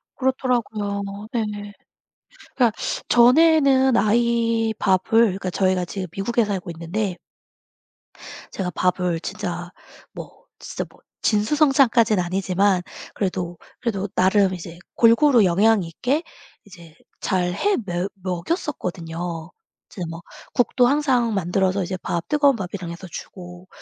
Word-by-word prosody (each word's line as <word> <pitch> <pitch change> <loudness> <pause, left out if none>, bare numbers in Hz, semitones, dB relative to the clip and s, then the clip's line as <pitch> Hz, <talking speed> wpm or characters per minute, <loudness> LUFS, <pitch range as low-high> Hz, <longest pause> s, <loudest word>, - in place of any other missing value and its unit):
그렇더라고요. 235 -6 -1 0.3
네. 230 -2 +1 1.1
그러니까 240 -4 +3 0.4
전에는 265 0 +5
아이 230 +1 +2
밥을 195 +4 +2
그러니까 190 -4 +1
저희가 185 -1 +1
지금 185 +1 -5
미국에 230 +4 0
살고 190 -4 -4
있는데 175 +4 -3 1.4
제가 180 -2 -3
밥을 180 -1 0
진짜 175 -2 -5 0.4
뭐 - - -11
진짜 - - -5
뭐 - - -22 0.2
진수성찬까지는 235 - +3
아니지만, 185 +1 +1 0.3
그래도, 180 -3 -3 0.2
그래도 205 -5 -2
나름 190 0 +3
이제 170 -1 -8 0.2
골고루 235 -1 +5
영양 205 +4 +3
있게 255 - -1 0.4
이제 170 -5 -15 0.3
잘해 185 - 0
뭬억 175 +2 -2
먹였었거든요. 175 - -4 0.4
이제 185 - -9
뭐 165 +1 -7 0.3
국도 245 0 +3
항상 255 -5 +2
만들어서 190 +1 0
이제 185 +2 -4
밥 170 -1 -3
뜨거운 285 -3 +3
밥이랑 180 -2 -5
해서 180 +2 -9
주고 180 +2 -10
195 Hz, 275 characters per minute, -22 LUFS, 180-235 Hz, 1.4 s, 전에는